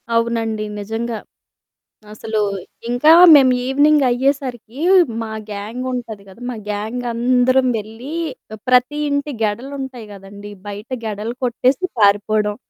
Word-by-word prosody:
అవునండి. 225 -2 0
నిజంగా. 225 +3 -4 1.0
అసలు 215 0 -3 0.5
ఇంకా 245 +6 +4 0.2
మేము 270 -3 +7
ఈవెనింగ్ 290 +2 +3
అయ్యేసరికీ 255 -2 -2 0.5
మా 225 - -6 0.2
గ్యాంగ్ 210 +5 -5
ఉంటది 230 -5 -6
కదా! 195 +5 -16
మా 250 - -4
గ్యాంగందరం 245 +4 +1
వెళ్లి 225 +7 -8 0.4
ఆహ్, 220 - -9
ప్రతి 255 +4 +3
ఇంటి 285 +1 -1
గెడలు 235 +6 -2
ఉంటాయి 260 -4 -7
గదండీ! 200 +1 -11 0.2
బయట 205 +2 -7 0.2
గెడలు 215 +2 -4
కొట్టేసి 255 +6 +1
పారిపోవడం, 210 +1 +2
235 Hz, 115 wpm, -19 LUFS, 215-255 Hz, 1.0 s, మేము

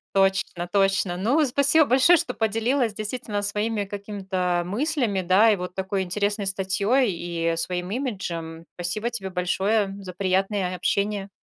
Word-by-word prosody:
Точно 190 -2 +1
точно. 195 -1 +1
Ну, 260 - +2
спасибо 280 +4 +4
большое, 270 +7 +5
что 250 - -2
поделилась 225 +2 0
действительно 215 -1 -4
своими 210 +1 -1
какими-то, 190 -3 -2
мыслями, 225 - -1
да, 190 +5 +5
и - - +3
вот 180 -1 -6
такой 190 +1 -2
интересной 200 +2 -1
статьёй, 200 +6 +2
и 170 -1 -2
своим 180 +2 -2
имиджем. 170 -10 -4
Спасибо 195 +7 -3
тебе 195 -5 -3
большое 195 +3 0
за 185 -2 -8
приятное 190 0 0
общение. 200 +2 -1
200 Hz, 135 wpm, -24 LUFS, 185-225 Hz, -, большое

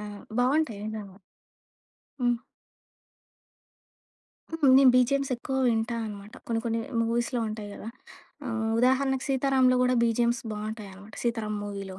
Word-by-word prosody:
ఆ! - - -7 0.4
బావుంటాయి 255 -4 +1
నిజంగా. 205 -3 -7 1.0
హ్మ్. 240 -1 +2 2.1
హ్మ్. 320 -4 +2
నేను 270 -2 +7
బిజిఎమ్స్ 275 +2 +2
ఎక్కువ 265 +2 -4
వింటా 225 0 0
అన్నమాట. 205 0 -8
కొన్ని, 225 -1 -1
కొన్ని 230 -1 -1 0.2
మూవీస్‌లో 235 +2 0
ఉంటాయి 215 -1 -6
గదా! 220 - -8 0.6
ఆహ్, 225 -2 -2
ఉదాహరణకు 265 +1 +2
'సీతారాంలో' 265 -2 +3
కూడా 250 0 +3
బిజిఎమ్స్ 235 +1 +1
బావుంటాయన్నమాట, 210 -1 -7
'సీతారాం' 220 -3 -2
మూవీలో. 195 -2 -6
230 Hz, 115 wpm, -27 LUFS, 215-255 Hz, 2.1 s, నేను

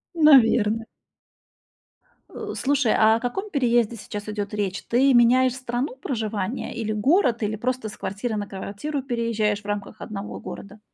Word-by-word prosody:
Наверно. 230 -7 +5 1.4
Э, - - -6
слушай, 275 -4 +2
а 220 0 +5
о - - -1
каком 385 - -3
переезде 240 - +2
сейчас 210 -1 -7
идёт 210 -1 -4
речь? 200 -2 -2
Ты 265 +3 +4
меняешь 250 +1 +5
страну 255 +1 -3
проживания 220 -4 -3
или 225 -2 -2
город, 240 - +2
или 215 +1 -1
просто 245 0 -2
с - - -12
квартиры 210 +4 -3
на 205 -1 -3
квартиру 205 +10 -5
переезжаешь 230 -5 -1
в 205 - -28
рамках 205 +1 -5
одного 205 -1 -6
города? 200 +2 -9
225 Hz, 150 wpm, -24 LUFS, 210-255 Hz, 1.4 s, Наверно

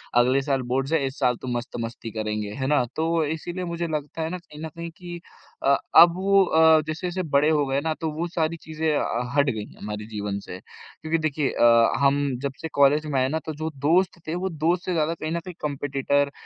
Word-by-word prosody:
अगले 125 +3 +4
साल 135 -1 0
बोर्ड्स 135 +3 0
हैं, 165 - +4
इस 135 +1 -5
साल 125 -3 +2
तो - - -7
मस्त 120 +2 -6
मस्ती 115 0 -6
करेंगे 105 -1 -3
है 130 - 0
ना, 145 -2 +3
तो 165 0 +1
इसीलिए 175 +4 -4
मुझे 170 0 -3
लगता 150 0 -4
है 160 - -1
ना 180 - -4
कहीं 150 -4 -14
न - - -5
कहीं 170 0 -6
कि 175 -1 -8 0.5
अ, 140 +1 +5 0.2
अब 170 0 +9
वो 195 +1 +4
अ, 160 -2 +5
जैसे-जैसे 175 +4 -3
बड़े 140 +2 +4
हो 150 -2 +2
गए 135 0 0
ना 160 +1 -1
तो 160 - -1
वो 165 +3 -2
सारी 165 -1 -1
चीज़ें 160 0 -4 0.5
हट 145 -1 +4
गयीं 110 -4 -5
हमारे 105 +1 -5
जीवन 105 -2 -4
से। 90 -2 -9
क्योंकि 160 - -5
देखिए 155 -3 0
अ, 115 -1 +5
हम 140 +1 +3 0.2
जब 140 - -1
से 165 - -3
कॉलेज 145 +2 +4
में 145 -3 0
आए 130 - +2
ना 160 +3 -1
तो 155 - -4
जो 160 - -1 0.2
दोस्त 180 +2 +2
थे 160 - -2
वो 185 +2 -2
दोस्त 170 +2 0
से 185 - -1
ज़्यादा 160 -1 +1
कहीं 155 -1 -5
न 170 - -1
कहीं 180 +2 -9
कॉम्पिटिटर, 140 0 0
155 Hz, 225 wpm, -24 LUFS, 135-165 Hz, 0.5 s, अब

